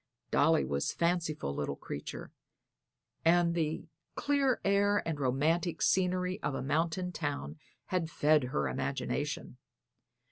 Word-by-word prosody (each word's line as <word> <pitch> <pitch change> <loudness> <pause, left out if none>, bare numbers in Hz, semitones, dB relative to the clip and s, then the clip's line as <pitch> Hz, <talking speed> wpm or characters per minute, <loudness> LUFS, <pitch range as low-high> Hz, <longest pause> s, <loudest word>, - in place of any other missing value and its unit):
Dolly 160 +1 +4
was 70 0 -1
a - - -12
fanciful 170 - 0
little 70 0 -2
creature, 70 - -7 0.9
and 170 0 +4
the 160 -2 -1 0.3
clear 280 -3 +2
air 200 0 +3
and 160 -3 -2
romantic 155 +7 +1
scenery 185 0 +1
of 140 - -1
a - - -3
mountain 165 +5 0
town 140 - -4 0.3
had 175 -3 -1
fed 150 -3 +3
her 70 - -1
imagination. - - -3
165 Hz, 120 wpm, -32 LUFS, 145-180 Hz, 0.9 s, Dolly